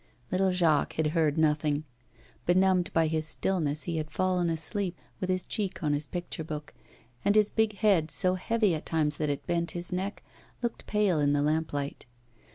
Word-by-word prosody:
Little 190 +1 +2
Jacques 165 -5 +2
had 160 -1 +1
heard 160 -3 +2
nothing. 150 -1 +2 0.6
Benumbed 185 0 +3
by 165 0 +3
his 155 0 -1
stillness, 155 -3 -1
he 170 -2 -2
had 155 0 -3
fallen 180 0 +1
asleep, 175 +3 -2 0.2
with 185 - -3
his 185 -1 0
cheek 195 -4 -3
on 150 -1 +2
his 145 0 -1
picture 175 -2 -5
book; 150 -1 -6 0.5
and 205 - +3
his 210 -1 +4
big 220 -1 +2
head, 190 -7 +3
so 185 +3 +1
heavy 210 +1 +1
at 155 - -3
times 155 -2 +1
that 150 -1 0
it 140 - -2
bent 170 -1 0
his 175 +1 -3
neck, 190 +3 -3 0.4
looked 235 - -3
pale 205 -6 +2
in 145 -1 +3
the 145 0 +2
lamplight. 150 -3 -1
170 Hz, 180 wpm, -29 LUFS, 155-185 Hz, 0.6 s, his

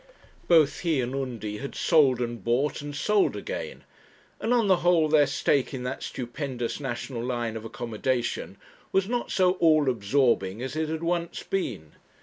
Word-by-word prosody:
Both 160 -4 +4
he 165 -5 +1
and 125 +1 -2
Undy 120 -6 -4
had 140 - -6
sold 140 -7 +4
and 120 -4 -4
bought 130 +6 0
and 145 0 -6
sold 210 +6 +2
again; - - -6 0.6
and 225 - -1
on 240 -3 +4
the 190 -2 +5
whole 175 -3 +3
their 150 -2 +4
stake 140 -1 +1
in 125 - -5
that 125 +1 -4
stupendous 125 -1 -4
national 125 -2 -4
line 120 -2 -2
of 110 0 -6
accommodation 120 -2 -3 0.3
was 190 0 +2
not 240 +1 -2
so 185 -1 +3
all 155 -5 +4
absorbing 110 -3 +1
as 130 +4 -5
it 155 0 -1
had 160 +1 -3
once 170 0 -2
been. 105 - -3
135 Hz, 165 wpm, -26 LUFS, 120-160 Hz, 0.6 s, the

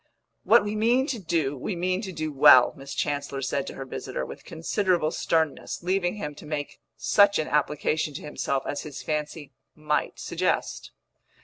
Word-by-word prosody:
"What 235 -2 +6
we 210 +1 -3
mean 235 +5 +3
to 265 -5 -3
do, 160 -6 -1
we 160 +8 -4
mean 185 +2 -1
to 195 -4 -5
do 155 -3 -4
well," 130 -2 +7
Miss 135 0 -8
Chancellor 140 -1 -2
said 140 +1 -1
to - - -7
her 135 - -6
visitor, 65 - -5
with - - -10
considerable 170 0 0
sternness; 160 0 -1
leaving 185 +1 0
him 150 -8 -5
to - - -12
make 150 -2 -4 0.2
such 200 0 +4
an 155 - -1
application 150 0 0
to - - -6
himself 140 -2 -2
as 145 - -3
his 150 -3 -8
fancy 150 -1 -4 0.2
might 150 -1 -1
suggest. - - -2
155 Hz, 175 wpm, -26 LUFS, 145-185 Hz, 0.2 s, well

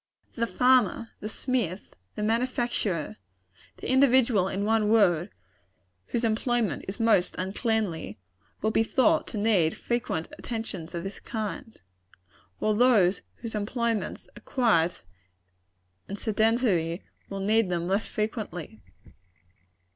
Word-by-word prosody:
The 235 -1 -1
farmer, 250 -3 +3
the 215 - -5
smith, 220 -7 -2 0.2
the 210 - -3
manufacturer 230 -6 -1 0.6
the - - -4
individual, 255 -7 +4
in 195 +1 -2
one 220 -1 +2
word, 195 -5 +4 0.8
whose 235 - -2
employment 230 0 0
is 195 +4 -5
most 220 -6 +3
uncleanly 190 - -1 0.5
will 215 - +2
be 220 - +3
thought 305 +7 +2
to 220 - -5
need 205 -7 +2
frequent 235 -9 -2
attentions 200 -8 -5
of 170 - -3
this 195 +1 -6
kind, 220 0 -5 0.8
while 215 - +1
those 210 -6 +4 0.2
whose 230 - -4
employments 225 +1 -2
are - - -12
quiet 180 - +1 1.0
and 200 - -5
sedentary, 215 -6 +1 0.3
will 195 - -4
need 210 +1 +2
them 175 -1 -1
less 195 +4 0
frequently. 200 - -4
215 Hz, 115 wpm, -27 LUFS, 185-235 Hz, 1.0 s, individual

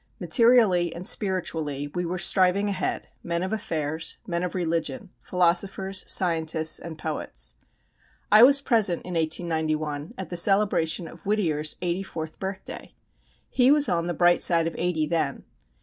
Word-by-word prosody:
Materially 225 -8 +3
and 175 +2 -7
spiritually 160 -8 -1
we 175 -1 -2
were 180 +2 -3
striving 190 +2 +2
ahead, 195 -1 -3
men 170 +1 -2
of 190 - -3
affairs, 160 -6 -2
men 170 -1 -2
of 180 0 -4
religion, 180 +5 -3
philosophers, 190 +2 +1
scientists, 160 -3 +1
and 165 -2 -9
poets. - - -4 0.8
I 215 +1 +8
was 275 +3 +7
present 215 -10 +1
in 180 - -6
1891 155 -2 -2
at 190 -4 -6
the 175 - -3
celebration 180 -3 +2
of 165 +2 -13
Whittier's 160 -8 0
eighty 175 +1 -1
fourth 160 -5 -7
birthday. 190 0 -7 0.5
He 250 0 +2
was 290 0 +4
on 170 0 -1
the 175 - -3
bright 175 +2 +3
side 165 -2 +3
of 165 - -3
eighty 170 -3 0
then. 165 +1 -2
175 Hz, 150 wpm, -25 LUFS, 160-195 Hz, 0.8 s, I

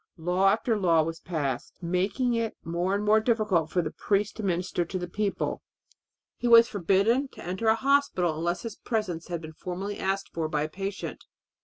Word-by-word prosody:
Law 180 +4 +2
after 225 +3 +1
law 165 -4 +4
was 165 +1 -4
passed, 145 -7 -3
making 190 +8 0
it 230 -1 -1
more 175 +3 -1
and 205 +1 -2
more 215 +1 +5
difficult 215 -8 +1
for 175 +1 +1
the - - -3
priest 205 0 0
to - - -4
minister 180 -2 0
to 180 +3 -4
the 180 -1 -4
people. 200 +3 -2 0.8
He 245 - -1
was 230 0 +8
forbidden 205 +7 +2
to - - -10
enter 185 +5 -2
a 220 - +6
hospital 245 - +2
unless 170 +2 -2
his 225 -3 -5
presence 195 -8 -3
had 170 -2 -4
been 160 -1 -9
formally 190 +5 -5
asked 195 +1 -1
for 160 -2 -2
by 150 -1 0
a 155 - -3
patient. 195 +3 -5
190 Hz, 190 wpm, -27 LUFS, 170-215 Hz, 0.8 s, was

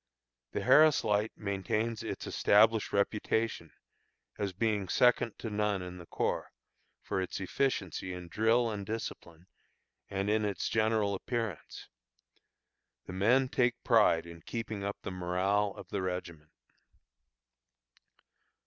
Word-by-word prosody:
The - - -2
Harris 155 -1 +6
Light 105 +1 +1
maintains 105 +3 -2
its 115 - -5
established 110 +1 +3
reputation, 105 -3 0 0.6
as 100 -2 -2
being 105 -1 -1
second 120 +1 +3
to 110 - -5
none 105 -2 0
in 90 0 -8
the 85 - -11
corps, - - -2 0.5
for 95 - -2
its 95 - -4
efficiency 95 - -1
in 90 -1 -7
drill 115 +5 +2
and 105 -2 -4
discipline, 90 -5 -6 0.6
and 100 0 -2
in 110 +1 +2
its 100 -2 -2
general 110 -2 +1
appearance. 115 -2 -4 1.2
The - - -8
men 120 +8 +3
take 125 -1 0
pride 105 -9 +4
in 85 -1 -11
keeping 110 -2 -5
up 100 0 -3
the - - -4
morale 95 +3 0
of - - -11
the 100 - -2
regiment. 85 -4 -5
105 Hz, 125 wpm, -31 LUFS, 95-115 Hz, 1.2 s, Harris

